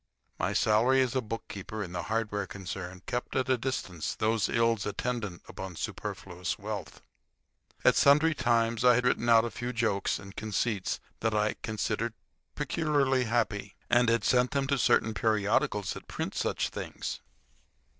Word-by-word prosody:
My - - 0
salary 115 +5 +4
as 125 - -2
bookkeeper 110 -4 -4
in 90 - -7
the 90 -1 -3
hardware 105 -3 -1
concern 90 -1 -7
kept 120 - -3
at 130 - +1
a 130 - +5
distance 115 - -3
those 110 0 +1
ills 115 -3 +2
attendant 105 -4 -3
upon 95 -2 -7
superfluous 90 +3 -4
wealth. 100 -7 -6 0.8
At - - +6
sundry 150 +3 +5
times 115 -3 +1
I 125 -1 +7
had 125 +1 +1
written 120 -1 +2
out 115 0 +6
a 120 - -3
few 120 0 -4
jokes 115 -5 0
and 100 0 -11
conceits 110 -2 -1 0.2
that 110 -1 0
I 105 0 +2
considered 110 -1 -2 0.4
peculiarly 140 -5 +1
happy, 110 -3 -1 0.2
and 120 0 +5
had 115 0 +2
sent 125 0 +3
them 140 -1 0
to 140 -2 +2
certain 110 -1 +3
periodicals 105 -2 +1
that - - -10
print - - -4
such - - -1
things. - - -5
115 Hz, 155 wpm, -29 LUFS, 100-125 Hz, 0.8 s, I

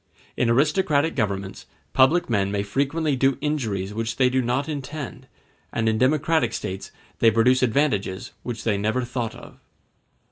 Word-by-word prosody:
In 120 - +1
aristocratic 150 +4 +2
governments 100 -5 -3 0.3
public 140 +7 +4
men 100 -4 +1
may 100 0 -1
frequently 140 +7 0
do 135 +1 +2
injuries 110 -10 -2
which 115 +1 -3
they 125 -1 +3
do 130 0 +2
not 125 +4 -1
intend, 145 -2 -6 0.4
and 115 -1 -1
in 110 0 +1
democratic 145 -2 +2
states 95 +1 -5 0.3
they 115 - +6
produce 120 +4 +3
advantages 110 -7 0
which 120 0 -5
they 105 -3 +1
never 110 +5 0
thought 120 -2 -3
of. - - -13
125 Hz, 150 wpm, -24 LUFS, 110-140 Hz, 0.4 s, they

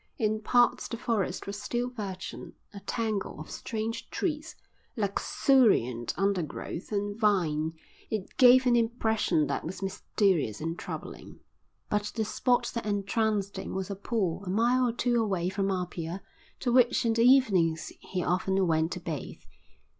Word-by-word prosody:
In 215 -1 0
parts 245 +3 +3
the 230 - -5
forest 215 -6 -1
was 200 +1 -5
still 240 +3 -1
virgin, 195 -6 -6 0.2
a 200 - -7
tangle 215 -5 -3
of 155 - -9
strange 225 0 -4
trees, 310 -2 -3 0.4
luxuriant 200 - +2
undergrowth, 185 -2 -2
and 205 0 -1
vine; 170 -8 +1 0.4
it 215 -4 -4
gave 255 0 +7
an 245 -1 +4
impression 220 -8 +1
that - - -2
was 185 +4 -6
mysterious 190 - 0
and 165 +2 -4
troubling. - - -8 0.5
But 210 0 -1
the 220 -2 0
spot 245 +2 +1
that 230 -3 -3
entranced 205 0 0
him - - -6
was 190 +1 -3
a - - -3
pool 195 -3 -2
a 185 - -6
mile 240 +5 +3
or - - 0
two 240 0 +1
away 190 -5 0
from 195 0 -1
Apia 180 -1 -3 0.4
to 245 - 0
which 245 0 +4
in 230 - +3
the 230 - +1
evenings 195 -11 +4
he 180 -2 -4
often 190 +2 +1
went 160 0 +1
to - - -5
bathe. 165 -4 -6
205 Hz, 155 wpm, -29 LUFS, 180-230 Hz, 0.5 s, gave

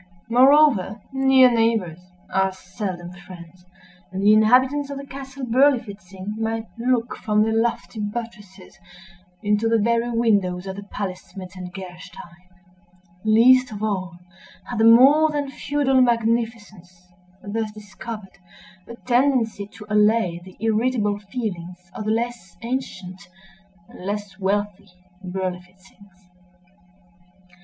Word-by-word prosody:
Moreover, 250 -5 +5
near 265 -1 +5
neighbors 225 -8 +1 0.3
are 190 0 +2
seldom 180 -1 -6
friends; 180 -1 -13 0.5
and 190 +1 -4
the 210 +1 +6
inhabitants 260 +6 +4
of 280 - -5
the 275 - -7
Castle 270 -1 -8
Berlifitzing 215 -6 0
might 225 0 -2
look, 240 0 0
from 210 0 +1
their 220 0 0
lofty 225 0 -1
buttresses, 205 -3 -7 0.6
into 210 +2 +1
the 230 - +3
very 235 +2 +1
windows 200 -6 +1
of 190 0 -6
the 200 - -7
palace 195 -2 -6
Metzengerstein. 180 -1 -10 0.7
Least 250 +4 +5
of 210 0 -6
all 185 -5 -2 0.5
had 240 - -5
the 225 - +4
more 270 +7 +7
than 290 -2 -3
feudal 275 -2 +1
magnificence, 230 -5 -1 0.5
thus 215 +1 -3
discovered, 210 -1 -10 0.5
a 235 - -9
tendency 245 -5 +1
to 210 0 -13
allay 210 -4 +2
the 185 0 -14
irritable 220 -1 0
feelings 180 -5 -6
of 215 - -6
the 215 - 0
less 225 -6 -3
ancient 195 -7 -5 0.7
and - - -13
less 205 0 -5
wealthy 205 0 -2 0.4
Berlifitzings. 185 +1 -8
215 Hz, 115 wpm, -22 LUFS, 190-235 Hz, 0.7 s, more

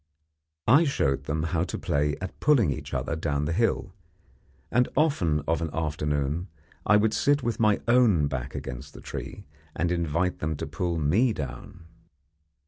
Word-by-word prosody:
I 140 +9 +6
showed 70 - 0
them 75 +1 -1
how 85 0 0
to - - -4
play 75 +1 0
at 95 0 -7
pulling 125 - +4
each - - -8
other 65 +6 -2
down 75 -3 -1
the 80 - -1
hill, 105 -2 0 0.8
and 125 +1 +3
often 100 - +2
of 80 0 +1
an 80 - -2
afternoon 75 +1 -1 0.4
I 105 - +6
would 110 +1 +2
sit 145 -1 +2
with 115 -1 -2
my 105 -2 +3
own 120 -10 +4
back 65 -3 -4
against 70 +2 -7
the - - -10
tree, - - -7 0.3
and 85 +2 0
invite 85 +1 0
them 80 0 -2
to - - -4
pull 85 +3 -2
me 95 - +2
down. 75 +3 -7
85 Hz, 165 wpm, -27 LUFS, 75-105 Hz, 0.8 s, I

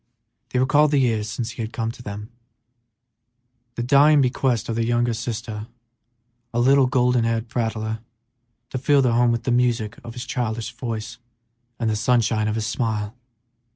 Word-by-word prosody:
They - - -2
recalled 145 +4 +4
the 145 - +2
years 110 -5 +1
since 115 +2 -4
he 120 - -7
had 110 0 -4
come 115 -1 -2
to 120 - -13
them, 105 +1 -7 1.4
the 120 - -2
dying 145 +4 +5
bequest 125 -3 +1
of 115 - -2
their 115 - 0
youngest 120 0 0
sister, 110 -2 -5 0.8
a 120 - -1
little, 135 +2 +5
golden 125 -1 +2
haired 115 0 -1
prattler, 110 -2 -2 0.7
to 130 - -2
fill 140 +1 +3
their 125 -2 +2
home 120 0 +4
with 115 -1 -1
the 125 - 0
music 120 -3 +1
of 115 -1 -8
his 120 - -5
childish 110 -2 -3
voice 115 -3 -5 0.6
and 115 - 0
the 110 - +1
sunshine 110 -1 +2
of 105 - -1
his 110 -1 -2
smile. 110 0 -2
120 Hz, 170 wpm, -23 LUFS, 110-125 Hz, 1.4 s, dying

